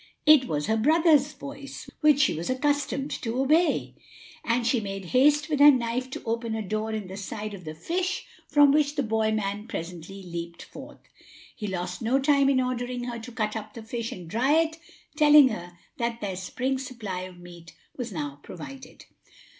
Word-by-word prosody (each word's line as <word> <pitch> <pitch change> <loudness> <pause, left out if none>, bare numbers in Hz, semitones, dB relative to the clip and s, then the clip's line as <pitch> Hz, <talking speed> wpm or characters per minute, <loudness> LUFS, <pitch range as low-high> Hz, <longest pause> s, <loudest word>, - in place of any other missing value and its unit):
It 305 -4 +7
was 150 -1 -1
her 220 - +1
brother's 305 +2 +4
voice, 280 -1 -9
which 300 -2 +5
she 280 - +3
was 165 +2 -4
accustomed 285 +1 0
to 235 +2 -2
obey; 310 +6 +2 0.5
and 235 +1 0
she 245 +1 +2
made 195 -2 -5
haste 295 +4 +4
with 300 -3 -1
her 290 +1 +10
knife 250 -1 +1
to - - -7
open 230 0 -2
a 220 - -3
door 215 +3 -2
in 215 -2 -3
the 185 +1 -8
side 210 +2 -5
of 180 -4 -10
the 155 0 -6
fish, 360 - -2 0.2
from 290 -1 +6
which 295 0 +2
the 285 - 0
boy 220 -1 +1
man 210 0 -2
presently 180 +1 -7
leaped 170 -1 -7
forth. - - -12 0.5
He 210 - -5
lost 180 -1 -4
no 235 +4 +2
time 280 0 +3
in 270 -2 +3
ordering 250 -1 -2
her 240 -1 -4
to 230 +2 -9
cut 220 -2 -2
up 215 -1 -7
the 230 - -8
fish 230 +1 -4
and 180 -2 -8
dry 240 - +1
it; 320 0 +2 0.4
telling 300 -2 +7
her 175 -5 -7 0.2
that 235 0 -2
their 200 -4 -3
spring 255 +8 -2
supply 230 -8 -5
of 185 -1 -12
meat 170 -2 -13 0.2
was 245 -3 -5
now 145 -5 -5
provided. 255 - -10
235 Hz, 190 wpm, -26 LUFS, 195-275 Hz, 0.5 s, her